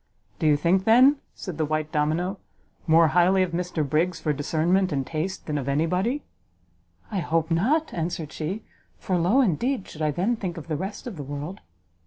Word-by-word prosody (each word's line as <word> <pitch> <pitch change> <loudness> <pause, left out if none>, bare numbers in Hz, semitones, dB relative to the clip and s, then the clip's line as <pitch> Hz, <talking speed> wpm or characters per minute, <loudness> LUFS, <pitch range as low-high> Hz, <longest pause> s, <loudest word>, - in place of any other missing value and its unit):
"Do 160 - +2
you 150 -1 +5
think, 180 +5 +2
then," 255 +6 +6 0.2
said 175 -5 -7
the 155 - +2
white 155 0 -2
domino, 165 +6 0 0.5
"more 160 0 +6
highly 180 +3 +4
of 180 - -2
Mr 170 -3 -2
Briggs 165 +5 +1
for 150 - 0
discernment 170 +6 +1
and 135 -2 -1
taste 165 +6 -4
than 150 -2 -2
of 135 0 -3
any 145 +4 +2
body?" 195 - -1 0.9
"I 200 - -1
hope 165 -1 0
not!" 275 - +1
answered 165 -2 -3
she, 185 +8 -4 0.3
"for 185 - -2
low 180 +10 +3
indeed 240 - 0
should 155 - -10
I 155 - +2
then 190 +11 0
think 180 -5 -4
of 165 - -8
the 155 - 0
rest 190 +6 -5
of 230 -8 -6
the 145 - -5
world!" 145 +6 -6
170 Hz, 195 wpm, -25 LUFS, 155-190 Hz, 0.9 s, then